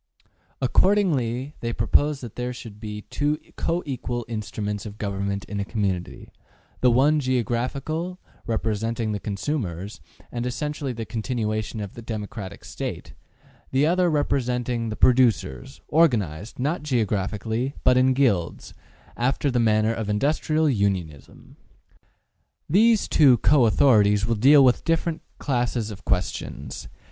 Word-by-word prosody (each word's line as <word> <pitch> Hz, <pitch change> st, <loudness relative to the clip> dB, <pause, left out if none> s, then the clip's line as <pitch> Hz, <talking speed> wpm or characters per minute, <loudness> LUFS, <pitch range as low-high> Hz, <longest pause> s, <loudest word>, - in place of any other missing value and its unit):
Accordingly 140 Hz, -, +2 dB
they 115 Hz, -, -2 dB
propose 145 Hz, +6 st, +2 dB
that 120 Hz, -4 st, -8 dB
there 125 Hz, 0 st, -3 dB
should 115 Hz, -4 st, -10 dB
be 105 Hz, -1 st, -6 dB
two 150 Hz, +1 st, 0 dB, 0.2 s
co 170 Hz, +2 st, -1 dB
equal 120 Hz, -4 st, -4 dB
instruments 105 Hz, -2 st, -4 dB
of 105 Hz, 0 st, -10 dB
Government 100 Hz, -1 st, -3 dB
in 105 Hz, -, -5 dB
a -, -, 0 dB
community, 95 Hz, -4 st, -3 dB, 0.5 s
the 125 Hz, -, +4 dB
one 140 Hz, +6 st, +4 dB
geographical, 130 Hz, -, -2 dB, 0.3 s
representing 115 Hz, 0 st, -1 dB
the 105 Hz, -, -2 dB
consumers, 100 Hz, -, -4 dB, 0.3 s
and 120 Hz, 0 st, -3 dB
essentially 150 Hz, +2 st, -3 dB
the 115 Hz, -2 st, -5 dB
continuation 110 Hz, -1 st, -3 dB
of 100 Hz, -2 st, -6 dB
the 120 Hz, -, -9 dB
democratic 105 Hz, -3 st, -6 dB
State; -, -, -6 dB, 0.6 s
the 135 Hz, +3 st, +2 dB
other 180 Hz, +2 st, +3 dB
representing 125 Hz, -5 st, 0 dB
the 110 Hz, -, -4 dB
producers, 110 Hz, -, +2 dB
organized, 115 Hz, -, +1 dB
not 150 Hz, +7 st, -1 dB
geographically, 110 Hz, -1 st, -1 dB
but 125 Hz, -, +5 dB
in 130 Hz, +1 st, +4 dB
guilds, 105 Hz, -11 st, 0 dB, 0.4 s
after 135 Hz, +3 st, 0 dB
the 120 Hz, -, +1 dB
manner 110 Hz, -1 st, +3 dB
of 110 Hz, -2 st, -4 dB
industrial 155 Hz, +7 st, +1 dB
unionism. 95 Hz, -, -2 dB, 1.1 s
These 220 Hz, +6 st, +4 dB
two 140 Hz, -4 st, +6 dB
author 125 Hz, -3 st, +5 dB
ities 105 Hz, 0 st, +2 dB
will 115 Hz, -, +1 dB
deal 135 Hz, +5 st, +6 dB
with 125 Hz, -, +3 dB
different 165 Hz, 0 st, 0 dB, 0.2 s
classes 120 Hz, -4 st, -1 dB
of 105 Hz, 0 st, -11 dB
questions. 90 Hz, -1 st, -3 dB
120 Hz, 130 wpm, -24 LUFS, 105-140 Hz, 1.1 s, two